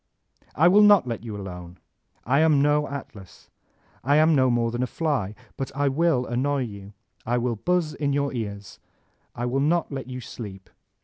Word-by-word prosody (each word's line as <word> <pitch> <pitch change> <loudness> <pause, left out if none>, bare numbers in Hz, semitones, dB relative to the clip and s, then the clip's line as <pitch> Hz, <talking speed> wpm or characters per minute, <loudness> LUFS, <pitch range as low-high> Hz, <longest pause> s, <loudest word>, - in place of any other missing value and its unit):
'' - - -36
*1 170 +5 +5
will 205 +2 +6
not 205 -6 +6
let 115 -2 -5
you 110 -3 -6
alone. 90 -2 -8 0.5
I 140 +5 +2
am 155 -2 +4
no 150 +1 +2
Atlas. 110 -9 -10 0.5
I 140 +3 +3
am 155 +2 +5
no 130 -3 +3
more 120 -1 +1
than 120 +1 -3
a 125 - 0
fly; 130 - -2 0.2
but 135 - -4
I 140 0 +1
will 150 -2 +1
annoy 130 +3 -1
jrou, 100 -2 -10 0.3
I 120 +2 0
will 120 -1 -1
buxs 175 - 0
in 145 -1 -2
your 140 0 0
cars; 100 -5 -6 0.6
I 120 - -3
will 125 +2 0
not 160 +4 +1
let 135 -2 -5
you 125 0 -6
sleep. 100 -5 -9
130 Hz, 190 wpm, -24 LUFS, 115-150 Hz, 0.6 s, will